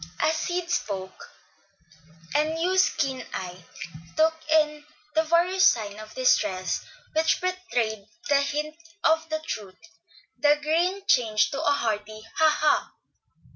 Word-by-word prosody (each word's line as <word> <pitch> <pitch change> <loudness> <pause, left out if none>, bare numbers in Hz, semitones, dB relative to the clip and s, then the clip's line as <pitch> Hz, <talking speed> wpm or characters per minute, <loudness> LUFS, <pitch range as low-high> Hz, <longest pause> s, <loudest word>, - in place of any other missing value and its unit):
As 320 - +2
Sid 350 +2 -2
spoke 190 - -4 1.0
and 310 +2 +1
Hugh's 370 +3 +3
keen 270 -5 -2
eye 180 -1 -6 0.5
took 320 +1 +4 0.2
in 300 -1 +2 0.3
the 320 - +4
various 345 +4 +2
signs 210 -3 0
of 215 0 -12
distress 200 -7 +1 0.3
which 320 +1 +2
betrayed 245 - -2 0.2
a 280 -1 +5
hint 300 +2 -2 0.3
of 320 0 +2
the 315 0 -3
truth, 200 - -6 0.6
the 295 0 +5
grin 345 +6 0
changed 215 - +3
to 275 - -3
a - - +2
hearty 215 -4 -2 0.2
"Ha! 315 -1 +6
ha!" 300 0 +1
300 Hz, 130 wpm, -26 LUFS, 215-320 Hz, 1.0 s, Ha